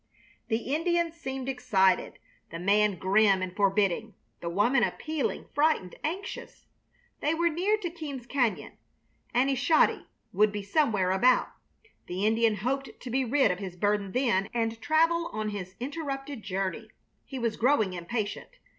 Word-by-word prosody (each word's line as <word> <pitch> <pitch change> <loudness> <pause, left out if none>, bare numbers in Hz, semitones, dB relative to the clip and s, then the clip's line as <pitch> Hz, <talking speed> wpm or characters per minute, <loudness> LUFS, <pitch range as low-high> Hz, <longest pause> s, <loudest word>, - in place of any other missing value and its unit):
The 230 +4 -1
Indians 340 +1 +1
seemed 265 -5 -5
excited 215 -8 +2 0.3
the 165 - -6
man 200 +3 +3
grim 195 +1 +3
and 185 0 -5
forbidding, 200 +1 +1 0.2
the 170 - -4
woman 220 +9 +2
appealing, 310 +3 -2
frightened, 290 - +1
anxious. 370 +6 -5 0.5
They 310 +2 +1
were 340 +1 +2
near 370 +7 +1
to 360 -5 -4
Keams 290 -7 -7
Cañon. 240 -6 0 0.6
"Aneshodi" 270 +5 +3 0.3
would 210 +2 +4
be 205 -1 -4
somewhere 200 -5 +1
about. 245 +7 +3 0.6
The 185 +3 -2
Indian 225 0 +3
hoped 265 +7 -3
to 250 - -8
be 265 +2 +1
rid 260 -3 +3
of 180 - -3
his 190 -3 -6
burden 205 +1 0
then 230 -6 +1
and 225 -1 -1
travel 330 +4 +2
on 215 0 -2
his 190 -2 -6
interrupted 275 -1 -5
journey. 195 -1 -3 0.3
He 270 - -8
was 230 -3 -1
growing 230 -6 +2
impatient. 205 - -4
230 Hz, 145 wpm, -28 LUFS, 200-285 Hz, 0.6 s, would